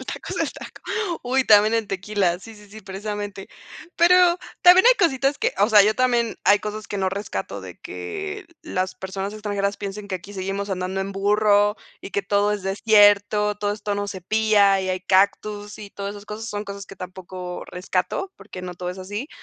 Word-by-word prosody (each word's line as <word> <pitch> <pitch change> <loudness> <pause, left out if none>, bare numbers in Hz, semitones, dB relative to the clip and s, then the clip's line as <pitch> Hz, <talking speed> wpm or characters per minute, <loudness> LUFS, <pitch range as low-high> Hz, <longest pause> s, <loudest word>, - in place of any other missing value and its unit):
El - - -10
taco - - -6
es - - -4
el - - -1
taco. - - -11 0.4
Uy, 260 +1 +1
también 215 0 +6
el 225 -2 0
tequila. 195 -2 -1
Sí, 225 +4 -12
sí, 210 0 -16
sí, 220 +1 -11
precisamente, 205 0 -6 0.5
pero 355 0 +5 0.2
también 365 +5 +8
hay - - +8
cositas 280 -6 +1
que, - - 0
o 205 +3 +4
sea, 210 -2 +7
yo 215 +2 +3
también, 240 -2 +1
hay 205 - +6
cosas 215 +1 -6
que 205 - -4
no 190 - +1
rescato 200 +2 -5
de - - -10
que 410 -2 -6 0.2
las 185 0 -2
personas 190 +2 -5
extranjeras 205 -1 -2
piensen 200 +1 -6
que 190 - -3
aquí 190 +3 -12
seguimos 195 +1 -4
andando 185 0 -2
en 195 +1 -4
burro 205 +1 +3 0.2
y - - -8
que 200 - -1
todo 205 +1 +1
es 205 -2 -3
desierto. 205 +1 +4
Todo 205 0 -1
esto, 205 -1 -3
no 205 0 -2
se 190 -2 -6
pilla 205 0 +3
y 190 - -3
hay 185 0 -1
cactus 205 +2 +1
y 205 -1 -9
todas 200 +1 -6
esas 205 0 -11
cosas 220 +2 -6
son 205 0 -4
cosas 200 -1 -8
que 195 - -12
tampoco 180 -1 -7
rescato 185 - -3
porque 185 - -10
no 180 -1 -6
todo 180 0 -5
es 180 - -9
así. 205 +9 -5
205 Hz, 205 wpm, -23 LUFS, 195-215 Hz, 0.5 s, también